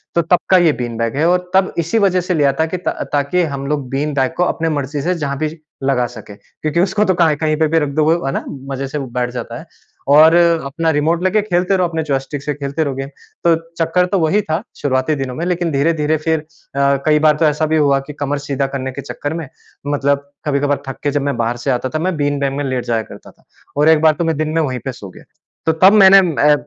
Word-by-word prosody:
तो 170 - +4
तब 175 +2 +2
का 185 - +6
ये 170 -3 +4
बीन 120 -2 -5
बैग 115 +1 -2
है, 155 - +2
और 180 0 0
तब 190 0 +3
इसी 170 +8 0
वजह 185 -3 +2
से 180 +1 -2
लिया 145 -4 +2
था 160 - +3
कि 180 +3 -4
ता 180 - -2 0.2
ताकि 145 +5 +1
हम 140 0 -4
लोग 145 -3 -2
बीन 145 +2 -2
बैग 135 +2 0
को 180 - +3
अपने 165 -2 -1
मर्ज़ी 145 -1 -2
से 180 +4 0
जहाँ 140 -4 -3
भी 155 0 -1 0.3
लगा 130 -3 +1
सकें। 110 -4 -11
क्योंकि 155 +2 -4
उसको 205 +3 +2
तो 190 - +2
कहाँ 165 -3 +3
इ - - -2
कहीं 155 0 0
पे 160 - +3
भी 165 +1 +2
रख 150 -2 -1
दो, 150 +2 +1
वो, 165 +1 +1
है 135 - 0
ना? - - -3 0.3
मज़े 135 0 -3
से 145 - -5
वो 135 -3 -4
बैठ 125 0 -2
जाता 125 - -6
है। - - -11 0.5
और 155 +3 +7
अपना 165 -2 +2
रिमोट 160 +4 0
लेके 200 +3 +2
खेलते 185 -1 0
रहो, 180 -1 +2
अपने 160 -1 -3
जॉयस्टिक 140 0 -3
से 150 - -2
खेलते 140 +2 -3
रहो 140 -3 -3
गेम। 135 +1 -5 0.3
तो 170 -1 +4 0.3
चक्कर 180 +2 +2
तो 195 - +2
वही 165 +6 +2
था 160 -1 -2 0.2
शुरुआती 135 +2 0
दिनों 135 -2 -4
में, 170 +5 -3
लेकिन 175 -2 -1
धीरे-धीरे 150 +2 +1
फिर 160 +1 0
अ, 155 - -14 0.6
कई 150 -1 +4
बार 150 -1 +4
तो 160 - +2
ऐसा 150 +1 +1
भी 160 +1 +1
हुआ 140 -2 +3
कि 150 - -7
कमर 145 0 -1
सीधा 135 0 0
करने 130 -1 -3
के 140 +2 -7
चक्कर 145 +3 -5
में, 165 -3 -5 0.4
मतलब 140 0 0
कभी-कभार 145 -1 0
थक 135 - -6
के 145 - +1
जब 145 -1 0
मैं 135 - -2
बाहर 120 +1 -1
से 135 - +2
आता 130 +1 -1
था, 155 - -3
मैं 185 +1 -1
बीन 145 -1 0
बैग 140 -1 -1
में 145 - -2
लेट 130 -2 -2
जाया 115 -2 0
करता - - -13
था, - - -31 0.3
और 150 +2 +4
एक 160 -1 +5
बार 160 -1 +5
तो 170 - +1
मैं 160 -2 0
दिन 155 0 -1
में 165 +1 +1
वहीं 130 -4 -2
पे 135 - -2
सो 100 -6 -10
गया। - - -15 0.4
तो 160 - +4
तब 190 +3 +8
मैंने 195 -2 +8 0.3
ए 150 - +6
150 Hz, 265 wpm, -17 LUFS, 140-165 Hz, 0.6 s, तब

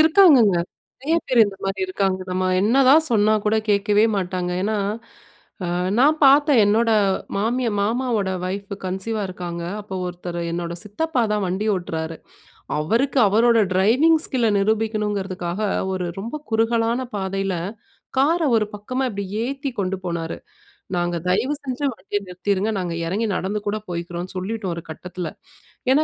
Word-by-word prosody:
இருக்காங்கங்க. 310 - +6 0.5
நறைய 320 +4 +2
பேர் 250 -2 +4
இந்த 195 - -7
மாரி 195 0 -2
இருக்காங்க. 190 0 0
நம்ம 185 +1 0 0.2
என்னதான் 270 +7 +5
சொன்னாக்கூட 215 0 +3
கேட்கவே 205 +1 +3
மாட்டாங்க. 180 -1 -2
ஏன்னா, 215 +1 0 0.9
அ - - -1 0.3
நான் 295 +5 +5
பாத்தேன் 280 -2 +6
என்னோட 225 +3 +3 0.5
மாமி 235 +5 0 0.2
மாமாவோட 225 -2 0
வைஃப் 195 +2 -4
கன்சீவா 200 +4 -2
இருக்காங்க. 175 -2 -5 0.2
அப்போ 200 -2 -7
ஒருத்தர் 175 -1 -5
என்னோட 170 0 -3
சித்தப்பாதான் 210 -3 0
வண்டி 190 +4 -1
ஓட்றாரு. 160 -2 -4 0.6
அவருக்கு 235 - +1
அவரோட 230 +3 +4
டிரைவிங் 250 - +4
ஸ்கில்ல 240 -4 +1
நிரூபிக்கணுங்குறதுக்காக 205 -3 -1 0.3
ஒரு 185 -1 -2 0.2
ரொம்ப 230 +8 -5
குறுகலான 230 +2 +1 0.2
பாதைல 195 0 -2 0.6
கார 315 +6 +3
ஒரு 215 - +2
பக்கமா 255 +6 -3
இப்டியே 200 0 -4
ஏத்தி 275 0 -4
கொண்டு 195 -1 -1
போனாரு. 170 -2 -3 0.6
நாங்க 175 0 0
தயவு 220 +10 +1
செஞ்சு 265 +1 -3
வண்டிய 205 0 -3
நிறுத்திருங்க 190 +3 -1
நாங்க 180 -3 -2
எறங்கி 210 +6 -1
நடந்து 195 +3 -2
கூட 205 +1 0
போய்க்றோம்னு 175 +1 -5
சொல்லிட்டோம் 190 0 -3
ஒரு 170 - -6
கட்டத்துல. 175 +1 -6 0.6
ஏன்னா, 290 +4 +4
205 Hz, 130 wpm, -22 LUFS, 185-235 Hz, 0.9 s, இருக்காங்கங்க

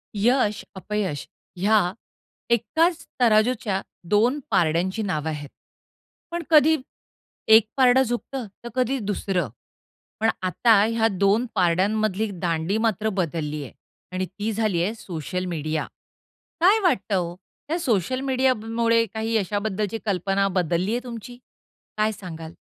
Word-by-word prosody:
यश, 215 0 +2
अपयश 190 -6 -3 0.3
ह्या 195 -1 +3 0.6
एकाच 320 - +1 0.2
तराजूच्या 215 -3 +3 0.3
2 235 +7 +3
पारड्यांची 175 +6 +1
नावं 160 -6 -2
आहेत. 145 -2 -5 0.8
पण 345 0 -3
कधी 315 0 +6 0.7
एक 220 0 +7
पारडं 260 0 +6
झुकतं, 245 +1 -4 0.2
तर 235 - -6
कधी 255 +1 +1
दुसरं. 195 - -1 0.7
पण 225 - +3
आता 200 +3 +4
ह्या 225 0 +2
2 200 +5 +3
पारड्यांमधली 200 +4 +1
दांडी 170 +3 0
मात्र 220 -1 0
बदलली 150 -3 -2
आहे 135 - -10 0.4
आणि 185 0 -2
ती 205 +5 -4
झाली 205 -6 +1
आहे, 210 +5 -1
सोशल 180 -2 -5
मीडिया. 155 -3 -2 0.8
काय 390 +6 +6
वाटतं 210 - +1
हो, 175 -2 -1 0.3
त्या 330 +4 -1
सोशल 255 - 0
मीडिया 265 -1 +2
मुळे 230 0 +2
काही 225 +1 -2
यशाबद्दलची 205 +1 -1
कल्पना 195 0 +1
बदलली 180 +3 +1
आहे 240 +1 -1
तुमची? 240 0 -8 0.6
काय 215 +1 +2
सांगाल? 165 -5 -8
210 Hz, 125 wpm, -24 LUFS, 180-235 Hz, 0.8 s, एक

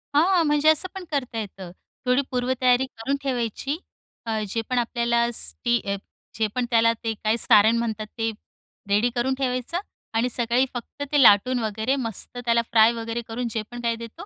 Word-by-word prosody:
हां, 345 +3 +4
म्हणजे 295 +1 +3
असं 315 +4 +3
पण 380 - -6
करता 255 -5 -2
येतं. 195 -4 -7 0.3
थोडी 250 +2 +3
पूर्वतयारी 250 0 +2
करून 265 +2 -3
ठेवायची 260 +2 -2 0.5
अ, 220 -1 -1
जे 225 +3 -1
पण 255 - 0
आपल्याला 235 0 +1
स्टि 240 +1 0 0.6
जे 220 -1 +1
पण 250 -1 0
त्याला 230 0 +5
ते 225 -1 -1
काय 215 +2 +2
सारण 220 +1 +5
म्हणतात 220 -2 -2
ते 225 0 0 0.6
रेडी 210 +4 +3
करून 250 +2 +1
ठेवायचं 255 +5 -1 0.3
आणि 230 +3 +1
सकाळी 240 +2 +1
फक्त 245 +4 -6
ते 290 - +4
लाटून 245 +2 +6
वगैरे 220 +4 -1
मस्त 240 -1 -4
त्याला 235 0 +3
फ्राय 225 0 +6
वगैरे 230 0 -4
करून 235 +1 -3
जे 220 0 -2
पण 240 0 -7
काही 235 -1 0
देतो 230 0 -9
235 Hz, 175 wpm, -24 LUFS, 225-255 Hz, 0.6 s, लाटून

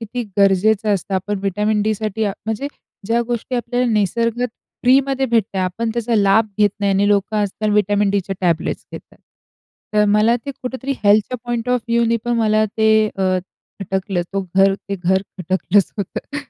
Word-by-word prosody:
किती 235 +2 -4 0.2
गरजेचं 200 +2 +3
असतं. 195 +1 -4
आपण 195 +2 -2
व्हिटॅमिन 210 +2 0
डीसाठी 215 0 -1
म्हणजे 220 +6 -4 0.4
ज्या 230 +1 +2
गोष्टी 240 +1 -3
आपल्याला 245 +1 -1
निसर्गत 230 +4 0 0.3
फ्रीमध्ये 270 +1 +3
भेटत 225 -5 0
आहेत. 185 - +1
आपण 225 +6 -2
त्याचा 235 0 -1
लाभ 205 +2 +4
घेत 205 -1 +4
नाही 200 -1 +2
आणि 200 +1 +2
लोकं 205 +1 +1
आज-काल 210 +1 -1
व्हिटॅमिन 205 0 +2
डीच्या 195 -1 -1
टॅबलेट्स 170 -3 -1
घेतात. - - -11 0.8
तर 210 0 +4
मला 210 +3 +3
ते - - -2
कुठेतरी 260 +2 -3
हेल्थच्या 210 +4 +3
पॉइंट 240 0 -3
ऑफ 250 -1 +2
व्ह्यूने 235 0 +2
पण 240 - 0
मला 215 -1 +3
ते 220 0 +3 0.3
अ, 185 -1 +1 0.4
खटकलं 190 -1 -2
तो 195 - 0
घर 195 0 +5
ते 200 0 -6
घर 190 +1 +1 0.2
खटकलंच 185 +2 +1
होतं. 205 +8 -5
210 Hz, 165 wpm, -19 LUFS, 195-230 Hz, 0.8 s, घर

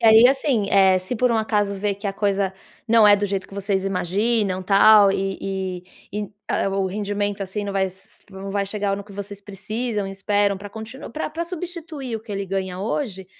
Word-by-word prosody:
E - - -3
aí 225 +2 +9
assim, 265 -6 +1
eh, 190 -1 +5
se 185 +6 -4
por 250 +2 +2
um 230 - +2
acaso 210 -2 +1
ver 200 +1 -1
que 200 +2 -6
a 195 - -1
coisa 195 -1 0 0.4
não 225 -1 +6
é 205 - +8
do 205 0 0
jeito 195 -1 -2
que - - -12
vocês 195 -1 -1
imaginam, 195 +1 0
tal, 200 +1 +7
e 190 -1 -3 0.3
e 210 - -3
e, 205 - -8 0.2
ah - - +1
ah, - - +2
o 195 0 0
rendimento, 205 +1 -2
assim, 195 +2 -4
não 200 -1 -3
s 190 -1 -4
não 195 0 -7
vai 200 0 0
chegar 200 -1 -1
no 200 - -6
que 205 - -14
vocês 200 0 -7
precisam, 210 +2 -3
e - - -5
esperam 200 +1 +1
para 200 +1 -9
continu 220 +5 -8
pra 310 - -3
pra 325 +2 -3
substituir 330 -7 -5
o - - -8
que 220 0 -13
ele 200 0 -2
ganha 190 -1 -3
hoje, 195 -2 -3
200 Hz, 220 wpm, -23 LUFS, 195-220 Hz, 0.4 s, aí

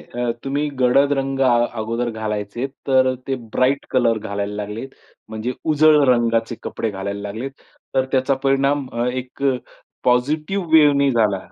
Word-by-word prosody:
अ, 120 -1 0
तुम्ही 140 +2 -1
गडद 140 +3 +4
रंग 135 0 -2
अ 120 -3 +4
अगोदर 115 +2 -2
घालायचे 110 +2 -3 0.2
तर 130 -1 +4
अ, 130 - +1
ते 135 - 0 0.2
ब्राईट 135 +2 +2
कलर 120 -3 +2
घालायला 100 -1 -4
लागलेत. 105 +5 -5 0.4
म्हणजे 110 +3 -3 0.2
उजळ 155 0 +5
रंगाचे 115 -1 +2
कपडे 115 - -3
घालायला 100 0 -5
लागलेत. 110 +7 -5 0.4
तर, 130 - +3
त्याचा 130 +1 +2
परिणाम 140 0 +2
अ, 120 +1 -1
एक 125 +2 -5
अ, 135 -2 +3 0.5
पॉझिटिव्ह 150 +9 +1
वेव्हनी 145 -3 +5
झाला. 110 -5 +2
125 Hz, 150 wpm, -21 LUFS, 110-135 Hz, 0.5 s, उजळ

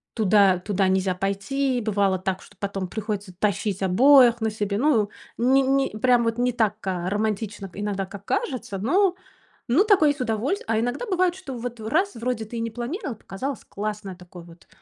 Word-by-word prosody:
Туда 200 -3 +4
туда 195 0 0
нельзя 190 0 +1
пойти. 240 +8 -1
Бывало 200 -3 +1
так, 190 0 -2
что 200 - -18
потом 195 -2 -3
приходится 210 -1 -4
тащить 200 -1 -1
обоих 240 +4 +6
на 220 - +1
себе. 205 -1 -2
Ну, 255 -6 +3
э, - - -15 0.3
ни 260 +3 +4
ни 270 -4 +1
прям 245 +1 +3
вот 230 0 -1
не 250 0 +2
так, 220 -3 +1
а, 180 -1 -1
романтично 210 -1 -2
иногда, 200 -1 -2
как 195 +1 -11
кажется. 255 - -2
Ну, 360 - +2 0.5
ну, 315 +12 +5
такое 380 -8 +5
и - - -4
с - - -16
удоволь 230 - 0
А 225 -1 +1
иногда 245 - -2
бывает, 370 -4 +1
что 315 -9 -8
вот 240 0 -6
в 220 - -6
раз, 375 - +1
вроде 230 -1 -2
ты 235 +2 -7
и - - -2
не 230 - -3
планировал, 245 - -4
показалось 250 +6 -6
классное 205 -1 -4
вот 180 - -17
такое 175 -1 -12
вот, 170 0 -17
220 Hz, 200 wpm, -24 LUFS, 195-255 Hz, 0.5 s, обоих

